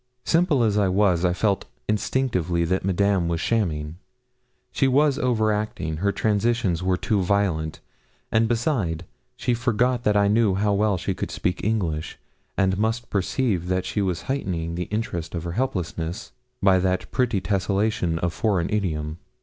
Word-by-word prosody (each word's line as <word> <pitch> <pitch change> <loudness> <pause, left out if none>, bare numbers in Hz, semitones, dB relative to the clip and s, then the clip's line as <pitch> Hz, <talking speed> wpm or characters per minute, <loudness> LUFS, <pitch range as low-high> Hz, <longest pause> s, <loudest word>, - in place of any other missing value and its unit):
Simple 165 -6 +3
as 105 -2 +2
I 100 - +3
was, 95 -2 +2
I 90 - +3
felt 100 +2 0 0.2
instinctively 95 -6 0
that 95 +3 0
Madame 95 -1 +2
was 85 -1 -1
shamming. 80 -6 -1 0.7
She 135 - +2
was 140 +2 +3
over 110 -5 +2
acting; 105 -7 -2
her 100 +4 +1
transitions 105 -4 +1
were 90 0 +1
too 105 +1 0
violent, 90 -5 0 0.5
and 110 +1 +3
beside 110 - -1 0.3
she 125 - 0
forgot 120 +1 +1
that 105 -1 +3
I 100 0 +4
knew 105 -2 +3
how 100 +1 +1
well 100 -1 +2
she 90 +2 -2
could - - -4
speak 90 - -2
English, 90 -8 -1 0.4
and 95 0 +2
must 115 +2 -1
perceive 100 -2 0
that 95 0 0
she 105 - -1
was 90 -3 -1
heightening 90 -11 -2
the 90 +1 -3
interest 90 -6 -3
of 85 - -3
her 85 - -4
helplessness 90 -6 -3 0.3
by 95 -1 +5
that 95 0 -1
pretty 120 -5 +1
tessellation 95 -2 0
of 90 -1 0
foreign 100 -7 0
idiom. 80 -6 -2
100 Hz, 160 wpm, -24 LUFS, 90-110 Hz, 0.7 s, by